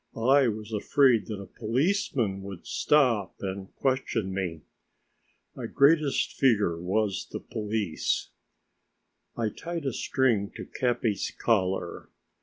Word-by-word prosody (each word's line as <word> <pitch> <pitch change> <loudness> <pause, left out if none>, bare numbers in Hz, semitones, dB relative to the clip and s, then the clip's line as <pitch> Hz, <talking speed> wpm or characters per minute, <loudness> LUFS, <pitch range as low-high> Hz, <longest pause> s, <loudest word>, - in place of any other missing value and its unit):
I 130 +4 +4
was 110 0 -4
afraid 120 +1 +3
that 105 -3 -5
a 100 - -7
policeman 120 - 0
would 95 -3 -9
stop 125 -10 +2
and 95 0 -5
question 125 -7 -1
me. 90 -5 -3 0.9
My - - -5
greatest 145 0 +3
fear 105 -10 +3
was 100 +1 -1
the - - -4
police. 105 -5 -2 1.1
I 115 -2 0
tied 165 +6 -6
a 135 - -1
string 115 -8 +1
to - - -7
Capi's 120 -4 -1
collar. 95 -6 0
110 Hz, 115 wpm, -28 LUFS, 100-130 Hz, 1.1 s, I